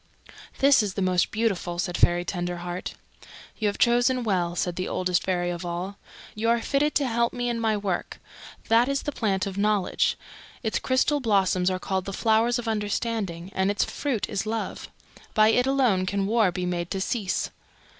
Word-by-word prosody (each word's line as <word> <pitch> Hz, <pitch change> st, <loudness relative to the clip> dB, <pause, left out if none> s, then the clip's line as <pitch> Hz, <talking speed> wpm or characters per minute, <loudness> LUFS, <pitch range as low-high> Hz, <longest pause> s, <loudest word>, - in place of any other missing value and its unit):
"This 275 Hz, -2 st, +5 dB
is 205 Hz, -3 st, -3 dB
the 195 Hz, -, -2 dB
most 180 Hz, -1 st, +2 dB
beautiful," 195 Hz, -6 st, -1 dB
said 175 Hz, 0 st, -2 dB
Fairy 175 Hz, 0 st, +3 dB
Tenderheart. 175 Hz, 0 st, -4 dB, 0.6 s
"You 215 Hz, -, +1 dB
have 205 Hz, -, -1 dB
chosen 245 Hz, +1 st, +3 dB
well," 180 Hz, -5 st, 0 dB
said 175 Hz, -1 st, -1 dB
the 185 Hz, -, -3 dB
Oldest 180 Hz, -1 st, 0 dB
Fairy 175 Hz, -1 st, -1 dB
of 175 Hz, 0 st, -5 dB
All. 175 Hz, +3 st, -4 dB, 0.3 s
"You 225 Hz, +2 st, -1 dB
are 235 Hz, 0 st, +3 dB
fitted 285 Hz, +5 st, 0 dB
to 280 Hz, -2 st, +2 dB
help 235 Hz, 0 st, +1 dB
me 245 Hz, -1 st, -2 dB
in 235 Hz, -1 st, -1 dB
my 220 Hz, -2 st, +1 dB
work. 200 Hz, -3 st, -3 dB, 0.5 s
That 230 Hz, +3 st, +4 dB
is 275 Hz, 0 st, -1 dB
the 295 Hz, -, -2 dB
Plant 200 Hz, -8 st, 0 dB
of 195 Hz, 0 st, -4 dB
Knowledge; 205 Hz, -2 st, +1 dB, 0.5 s
its 220 Hz, -, 0 dB
crystal 265 Hz, +3 st, +1 dB
blossoms 195 Hz, -6 st, +2 dB
are 185 Hz, -, -1 dB
called 190 Hz, 0 st, -2 dB
the 195 Hz, -, -5 dB
Flowers 225 Hz, +3 st, +2 dB
of 240 Hz, -1 st, -5 dB
Understanding, 210 Hz, -4 st, -2 dB
and 190 Hz, +1 st, +1 dB
its 205 Hz, -2 st, +1 dB
fruit 235 Hz, -10 st, -2 dB
is 200 Hz, +2 st, -3 dB
Love. 225 Hz, +1 st, -4 dB, 0.5 s
By 215 Hz, -1 st, +6 dB
it 245 Hz, +3 st, +3 dB
alone 245 Hz, -9 st, +2 dB
can 200 Hz, +1 st, 0 dB
war 215 Hz, -2 st, +3 dB
be 180 Hz, 0 st, -3 dB
made 175 Hz, -1 st, -2 dB
to 195 Hz, -, -2 dB
cease." 195 Hz, 0 st, -1 dB
205 Hz, 185 wpm, -26 LUFS, 185-235 Hz, 0.6 s, By